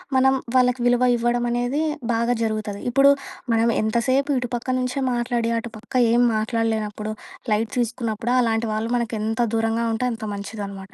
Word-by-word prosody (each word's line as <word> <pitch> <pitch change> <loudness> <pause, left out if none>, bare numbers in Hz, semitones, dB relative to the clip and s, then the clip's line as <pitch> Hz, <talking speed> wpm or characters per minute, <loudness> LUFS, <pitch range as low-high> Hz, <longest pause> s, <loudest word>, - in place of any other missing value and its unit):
మనం 265 +1 +5 0.2
వాళ్ళకి 250 -1 +3
విలువ 245 0 +3
ఇవ్వడం 240 +1 0
అనేది 245 +5 0 0.3
బాగా 235 +1 +1
జరుగుతది. 215 -2 -3
ఇప్పుడు 275 +3 +6 0.4
మనం 225 +1 +3
ఎంతసేపు 250 +6 +1
ఇటు 245 -1 -4
పక్క 240 +2 -5
నుంచే 255 +2 -2
మాట్లాడి, 240 -1 0
అటుపక్క 225 +1 -10 0.2
ఏం 240 +1 +4
మాట్లాడలేనప్పుడు, 215 -1 -1 0.4
లైట్ 215 +1 0
తీసుకున్నప్పుడు 240 -1 -1
అలాంటి 225 -1 +1
వాళ్ళు 220 +2 -2
మనకు 235 -1 -2
ఎంత 225 +2 -2 0.2
దూరంగా 225 +1 0
ఉంటే 250 +3 0
అంత 225 - -8
మంచిది 205 +1 -6
అనమాట. 195 -1 -10
230 Hz, 155 wpm, -23 LUFS, 220-245 Hz, 0.4 s, ఇప్పుడు